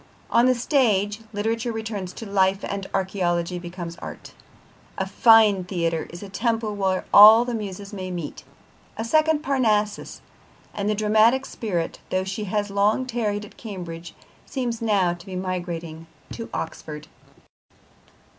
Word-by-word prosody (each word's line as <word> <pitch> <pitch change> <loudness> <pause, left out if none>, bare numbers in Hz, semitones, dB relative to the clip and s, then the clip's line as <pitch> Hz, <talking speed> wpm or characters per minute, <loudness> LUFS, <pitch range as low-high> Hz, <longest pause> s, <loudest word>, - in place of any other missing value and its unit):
On 235 +2 +5
the 255 - +4
stage, 215 -6 +1
literature 225 +3 -1
returns 220 -5 -4
to 225 - -8
life 195 -1 +1
and 195 -1 -4
archaeology 180 -2 -1
becomes 175 -1 -7
art. - - -9 0.6
A - - -1
fine 220 -5 +5
theatre 170 -3 -2
is 175 +4 -9
a - - -7
temple 225 +2 -1
where 190 -2 0
all 220 +3 +10
the 245 - -3
muses 205 -2 -6
may 185 -2 -5
meet, 175 -5 -6 0.5
a 225 - -3
second 310 +3 +2
Parnassus, 220 -7 0 0.5
and 205 0 -2
the 215 - +1
dramatic 220 +5 +3
spirit, 180 -11 -3
though 185 0 0
she 195 +3 -4
has 205 +1 -2
long 205 +5 +2
tarried 215 -4 -2
at - - -17
Cambridge, 175 -6 -8 0.3
seems 245 -3 -3
now 200 -6 +2
to 175 0 -11
be 190 -2 -8
migrating 175 -3 -4 0.2
to 230 - -7
Oxford. 150 -1 -6
205 Hz, 145 wpm, -24 LUFS, 185-225 Hz, 0.6 s, all